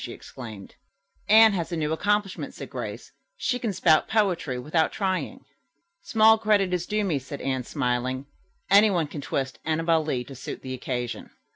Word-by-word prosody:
she - - -6
exclaimed. 110 -6 -10 0.6
"Anne 220 0 +8
has 175 -2 -3
a 170 - -2
new 155 0 -1
accomplishment," 205 +3 -1
said - - -9
Grace. - - -6 0.3
"She 250 - -1
can 230 -3 -1
spout 160 -4 +3
poetry 180 - 0
without 155 +6 0
trying." 190 -3 -2 0.6
"Small 220 0 +5
credit 205 -4 +2
is 175 -1 -1
due 210 0 0
me," 165 -8 0
said 140 +2 -8
Anne, 130 -1 -1
smiling. 130 -1 -1 0.5
"Anyone 200 -5 +5
can 145 0 -7
twist 135 -1 -3
'Annabel 165 0 +1
Lee' 130 -5 -2
to 135 - -11
suit 130 - -7
the 130 - -5
occasion." 125 -1 -4
160 Hz, 165 wpm, -26 LUFS, 130-200 Hz, 0.6 s, Anne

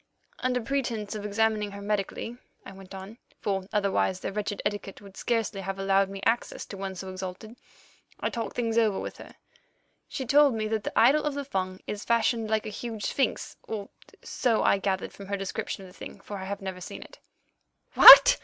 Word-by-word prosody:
"Under 255 -1 0
pretence 230 -5 -2
of 210 -1 -5
attending 210 0 0
her 200 - -8
medically," 210 +3 -3 0.3
I - - -9
went 195 0 -12
on, 195 +5 -10 0.2
"for 195 -2 -2
otherwise 200 -2 +1
their - - -4
wretched 205 0 -3
etiquette 205 -1 -3
would 200 -1 -14
scarcely 225 -4 -1
have 195 0 -4
allowed 195 0 +2
me 195 0 -7
access 230 +1 0
to - - -8
one 190 0 -5
so 190 +1 -7
exalted, 185 +4 -7 0.6
I - - -2
talked 230 -4 -4
things 230 -1 +1
over 215 -4 +2
with - - -6
her. - - -13 0.7
She 265 - -5
told 280 0 +5
me 215 -1 -2
that 220 -1 -1
the - - -1
idol 275 +6 +5
of 295 -2 -2
the 285 -1 -4
Fung 185 -6 -3
is 205 - -5
fashioned 230 -1 +1
like 220 -1 0
a - - -4
huge 220 0 -6
sphinx, 270 -4 -1
or 210 -3 -5 0.3
so 235 -3 0
I 200 - +3
gathered 190 -1 -2
from 200 - -11
her 200 0 -2
description 195 0 -4
of - - -12
the - - -19
thing, - - -9
for 205 - -7
I 190 - -6
have 200 +1 -5
never 190 -1 -6
seen - - -8
it." - - -16 0.7
"What!" - - +11
205 Hz, 200 wpm, -27 LUFS, 195-230 Hz, 0.7 s, What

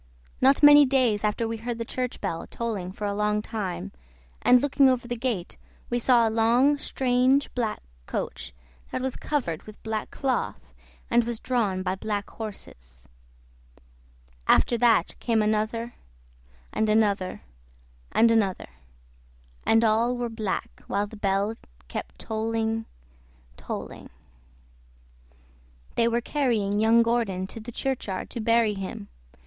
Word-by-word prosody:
Not 270 +3 +4
many 290 0 +10
days 255 -6 +2
after 215 +2 0
we 225 0 -3
heard 235 +1 -4
the 230 - -4
church 250 +1 -3
bell 165 - -4
tolling 210 -6 -4
for 205 +2 -6
a 200 - -1
long 210 +1 +1
time, 185 - -4 0.5
and 250 - +6
looking 275 0 +4
over 245 -2 0
the 240 - -2
gate 225 -7 -3 0.3
we 240 - +1
saw 235 -1 +4
a - - -1
long, 240 +6 +3
strange 260 +2 +1
black 230 -4 -2 0.2
coach - - -4 0.4
that - - -2
was 265 -1 -2
covered 235 - -2
with 215 -1 -14
black 220 -1 -3
cloth 265 -3 -3 0.4
and 240 0 +4
was 235 -1 -4
drawn 210 -7 0
by 185 0 0
black 205 +1 -3
horses; 65 - -9 1.4
after 240 - +4
that 230 -6 +3
came 230 -2 +1
another 220 +2 0 0.8
and 220 - +1
another 205 - +1 0.7
and 230 0 +5
another, 205 -5 +1 1.0
and 225 +1 +5
all 230 +3 +2
were 240 -1 -2
black, 220 -4 -4
while 200 +1 0
the 210 - -11
bell 200 +1 0 0.3
kept 60 0 -6
tolling, 225 - -2 0.7
tolling. - - -7 1.8
They 230 - +2
were 235 +1 +1
carrying 225 -8 0
young 225 +2 +5
Gordon 230 -6 0
to 210 - -8
the 230 +2 -8
churchyard 235 -7 -3
to - - -5
bury 230 -1 +3
him. 190 - -6
225 Hz, 135 wpm, -26 LUFS, 205-240 Hz, 1.8 s, many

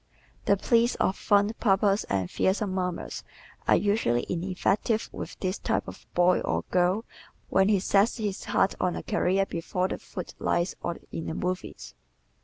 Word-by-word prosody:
The 200 - +4
pleas 235 +4 +3
of 190 - +1
fond 205 +1 +2
papas 200 -1 +3
and 95 -2 -1
fearsome 190 0 +1
mamas 180 -2 -3 0.4
are - - +6
usually 200 - +1
ineffective 190 +5 0
with - - -7
this 185 +1 -1
type - - -1
of - - -10
boy 180 +1 +4
or - - -1
girl 185 +5 +2 0.4
when 190 +1 +4
he 205 -2 +4
sets 200 +4 +2
his 210 -4 -3
heart 195 - +2
on 180 -1 +1
a - - -5
career 195 +2 +1
before 180 +1 -2
the - - -4
foot 180 - -7
lights 175 +1 0
or 170 - -3
in 165 - -5
the 160 - -3
movies. 180 +1 -4
190 Hz, 165 wpm, -27 LUFS, 180-205 Hz, 0.4 s, are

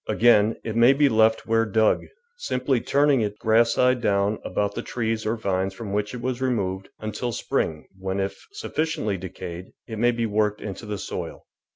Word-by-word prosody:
Again, 110 0 +4
it 110 - -4
may 120 +3 +6
be 140 0 +4
left 110 -1 +3
where 115 0 +2
dug, 110 0 +2 0.3
simply 130 - -1
turning 140 -2 +3
it 105 -1 -2
grass 115 +2 +3
side 125 -1 +3
down 100 0 +1
about 100 -1 -1
the - - -4
trees 110 -2 -2
or 110 - +1
vines 95 -3 -1
from 100 -1 -6
which 105 +3 -1
it 120 - -6
was 130 0 -2
removed, 95 -7 -1
until 110 +3 -3
spring, 80 -8 -2
when, 95 +1 -2
if 95 0 -4
sufficiently 160 - -2
decayed, 90 -1 -7 0.2
it 110 -2 -6
may 120 +1 +4
be 120 -1 0
worked 105 -1 0
into 105 +2 -7
the 105 -1 -3
soil. - - -6
110 Hz, 185 wpm, -24 LUFS, 100-120 Hz, 0.3 s, may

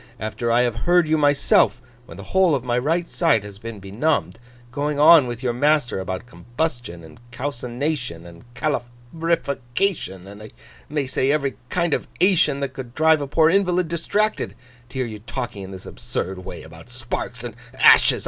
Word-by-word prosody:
After 115 +2 -2
I 120 +1 +4
have 120 -2 0
heard 175 -2 +4
you 155 - +3
myself, 145 -4 +3 0.3
when 85 - -11
the 100 - -8
whole 180 - +3
of 130 - -3
my 120 -1 -1
right 165 +6 0
side 115 -3 +2
has 100 -1 -11
been 115 -2 -7
benumbed, 110 +13 -1 0.3
going 145 +3 -2
on 150 -2 +8
with 120 +1 -6
your 120 -2 0
master 145 -4 +1
about 95 +3 -4
combustion, 120 - -4
and 80 -1 -14
calcination, 125 - -4
and 85 +8 -14
calorification, 130 - -2
and 100 +2 -11
I 110 - -10 0.4
may 145 -1 -1
say 130 +1 +1
every 140 -5 0
kind 170 -1 0
of - - -1
ation 175 -6 +3
that 135 -2 -3
could 125 -2 -8
drive 160 -1 +4
a 140 - -3
poor 160 +3 +4
invalid 180 -3 +2
distracted, 205 +6 -1 0.3
to 130 - -9
hear 130 - 0
you 110 -2 -7
talking 115 -1 -5
in 95 - -8
this 95 -1 -10
absurd 95 +1 -5
way 90 -2 -8
about 80 +7 -13
sparks 120 0 -5
and 120 -2 -6 0.2
ashes! - - +6
125 Hz, 175 wpm, -22 LUFS, 115-155 Hz, 0.4 s, on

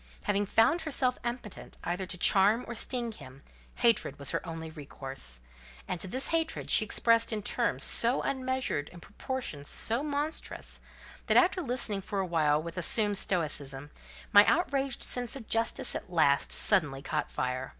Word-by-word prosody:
Having 200 0 0
found 225 - +3
herself 265 -5 0
impotent 240 -4 -6
either 180 +2 -3
to 180 - -3
charm 205 +6 +4
or 235 - -5
sting 240 0 -3
him, 135 -8 -13 0.3
hatred 230 - +2
was 140 -2 -2
her - - -2
only 160 -1 -6
resource; 135 - -7 0.5
and 180 - -3
this 250 +10 -1
hatred 325 -1 -1
she - - +6
expressed 230 +2 +2
in 215 -2 -3
terms 135 -6 0
so 235 +3 +2
unmeasured 260 - -2
and 175 -1 -13
proportion 210 - -5
so 225 - -2
monstrous, 295 +1 -4 0.5
that, - - +4
after 365 +1 +4
listening 240 - 0
for 200 +1 -4
a 190 - 0
while 155 -4 +2
with 170 +3 -6
assumed 205 +3 +1
stoicism, 145 -5 -2 0.4
my 205 0 +10
outraged 275 -6 +1
sense 245 0 -4
of 240 -5 -9
justice 225 0 0
at 185 - -6
last 140 -5 +3
and - - 0
suddenly 150 -9 +4
caught - - -2
fire. 130 +1 -3
205 Hz, 160 wpm, -29 LUFS, 155-250 Hz, 0.5 s, my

